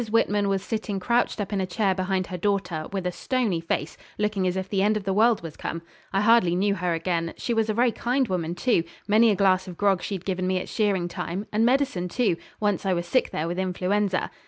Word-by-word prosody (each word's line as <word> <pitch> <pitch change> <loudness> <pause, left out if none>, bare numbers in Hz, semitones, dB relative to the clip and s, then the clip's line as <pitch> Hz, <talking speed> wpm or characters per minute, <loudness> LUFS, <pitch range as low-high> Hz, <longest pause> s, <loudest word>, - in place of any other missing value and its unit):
Whitman 205 -2 +2
was 195 -1 0
sitting 215 -3 -3
crouched 235 +4 +1
up 205 0 -3
in 195 - 0
a 185 - -2
chair 195 +1 +1
behind 185 0 -1
her 185 - -6
daughter, 180 -5 -1
with 195 -2 -3
a 180 - 0
stony 225 -5 -1
face, 160 -2 -3 0.2
looking 210 -3 0
as 180 +1 -1
if 190 0 -3
the 195 0 0
end 210 +2 +3
of 210 - -5
the 195 0 -1
world 220 0 +3
was 160 -3 -7
come. 165 0 -5 0.3
I 195 - +1
hardly 210 -5 +4
knew 200 +2 +2
her 180 -3 -1
again. 165 0 -2
She 240 - -2
was 225 -1 +1
a - - +2
very 240 +1 +3
kind 250 +3 0
woman, 175 -3 -2
too; 205 -2 +2 0.2
many 220 +2 +5
a 205 - +3
glass 190 -1 +2
of 180 -2 -8
grog 195 -3 +2
she'd 190 -3 -5
given 185 -1 -1
me 185 0 +1
at 180 - -4
shearing 200 -5 +1
time, 180 +3 -4
and 215 +2 +2
medicine 250 -9 +1
too, 225 -3 +1 0.2
once 205 -3 0
I 190 -2 +1
was 175 -1 -2
sick 255 +8 +1
there 160 - -2
with 175 +2 -3
influenza. 190 +1 0
195 Hz, 240 wpm, -25 LUFS, 180-210 Hz, 0.3 s, many